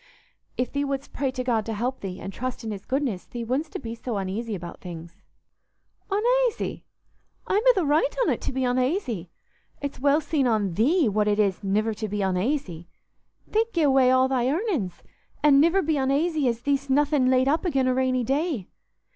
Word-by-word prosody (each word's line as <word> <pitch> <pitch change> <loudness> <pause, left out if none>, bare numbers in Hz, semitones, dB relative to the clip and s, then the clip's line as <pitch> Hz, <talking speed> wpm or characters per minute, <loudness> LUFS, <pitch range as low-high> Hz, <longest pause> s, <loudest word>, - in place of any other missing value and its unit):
If 250 - -1
thee 285 0 -1
wouldst 275 0 -4
pray 270 -1 -1
to 255 0 -4
God 235 -4 +1
to 225 - -2
help 250 +5 -2
thee, 190 -1 -6
and 195 - -7
trust 255 +2 -4
in 220 - -4
His 200 -2 -7
goodness, 260 -8 -1
thee 240 -1 -6
wouldstna 270 +5 -3
be 230 -1 -4
so 230 -1 -4
uneasy 205 +3 -3
about 175 -2 -8
things." 170 -1 -9 0.9
"Unaisy? 480 +4 +1 0.6
I'm 405 - +1
i' - - +8
th' 345 - 0
right 305 +12 +2
on't - - 0
to - - -3
be 260 0 -1
unaisy. 250 - -1 0.5
It's 285 0 -5
well 285 +3 +3
seen 290 -3 0
on 210 -6 +1
thee 280 - +3
what 210 0 +1
it 205 0 +2
is 200 -2 +1
niver 215 +3 +1
to 215 +1 -4
be 205 0 -2
unaisy. 185 - -1 0.6
Thee't 455 +2 0
gi' 335 - +2
away 265 -3 +5
all 260 0 +4
thy 255 -1 +1
earnin's, 300 - -2 0.4
an' 285 -2 +6
niver 340 +6 +4
be 315 -1 +1
unaisy 285 +2 +1
as 235 -1 -1
thee'st 280 +1 -1
nothin' 285 -1 +3
laid 260 0 +3
up 310 +3 +2
again' 275 -8 +1
a 255 - +3
rainy 255 -1 +1
day. 275 - -1
255 Hz, 190 wpm, -25 LUFS, 215-290 Hz, 0.9 s, i